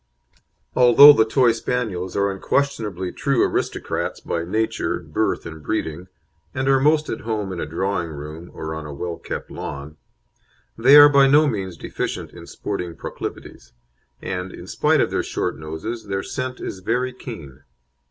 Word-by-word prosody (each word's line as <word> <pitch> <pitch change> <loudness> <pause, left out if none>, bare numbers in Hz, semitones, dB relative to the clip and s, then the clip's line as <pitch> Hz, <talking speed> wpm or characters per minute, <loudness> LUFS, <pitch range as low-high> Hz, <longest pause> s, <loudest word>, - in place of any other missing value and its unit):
Although 125 +4 +9
the 110 -5 +3
Toy 120 +1 +3
Spaniels 110 -6 -3
are 100 0 +2
unquestionably 100 -4 -1
true 140 -3 +1
aristocrats - - -2
by 85 - -3
nature, 110 +6 -1
birth, - - -2
and 80 -1 -8
breeding, 80 +4 -3 0.5
and 130 0 -1
are 135 0 +4
most 150 +2 +3
at 115 - -4
home 105 -4 -3
in 90 - -6
a - - -3
drawing 85 +2 -2
room 75 +3 -8
or 80 0 -6
on 80 -1 -6
a 75 - -7
well 85 +3 -4
kept - - -6
lawn, 70 +2 -7 0.8
they 130 +5 +6
are 145 0 +11
by 140 -1 +5
no 150 +3 +5
means 95 - -3
deficient - - -4
in - - -12
sporting 90 -5 -5
proclivities, - - -8 0.5
and, 90 0 -4
in - - -10
spite - - +2
of - - 0
their - - 0
short - - -3
noses, 105 +9 -6
their 95 -1 -2
scent 130 0 -4
is 95 - -6
very 125 +6 -1
keen. 80 - -10
100 Hz, 160 wpm, -22 LUFS, 85-125 Hz, 0.8 s, are